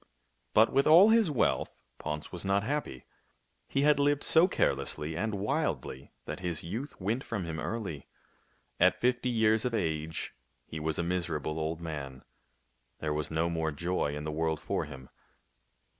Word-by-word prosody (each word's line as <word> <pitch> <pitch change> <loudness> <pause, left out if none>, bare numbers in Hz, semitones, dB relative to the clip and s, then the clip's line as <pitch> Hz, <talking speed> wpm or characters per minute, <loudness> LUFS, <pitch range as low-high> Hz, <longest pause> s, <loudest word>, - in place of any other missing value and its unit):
But, 110 +2 +5
with 135 +2 +3
all 175 +7 +8
his 225 -5 +5
wealth, 145 - +1 0.3
Ponce 75 0 -4
was 90 - -5
not 100 +1 +1
happy. 130 - -3 0.6
He 135 - 0
had 150 -1 +5
lived 145 0 +2
so 165 +3 +5
carelessly 75 - 0
and 110 +3 -1
wildly 100 - -2
that - - -5
his 90 -3 -3
youth 115 - -5
went 110 +7 -1
from 105 -6 -3
him 80 -1 -4
early. 100 -11 -4 0.7
At 90 +1 +4
fifty 125 0 +1
years 110 -2 +3
of 125 -2 0
age 80 -5 -2 0.3
he 80 - -6
was 80 0 -2
a - - 0
miserable 80 -3 -2
old 80 +1 -2
man. 70 -5 -6 0.7
There 75 -1 -2
was 75 0 -2
no 80 +1 +1
more 80 -2 -1
joy 80 -1 -1
in 75 - -5
the 75 - -3
world 80 0 -1
for - - -2
him. 65 -3 -10
85 Hz, 165 wpm, -30 LUFS, 75-115 Hz, 0.7 s, all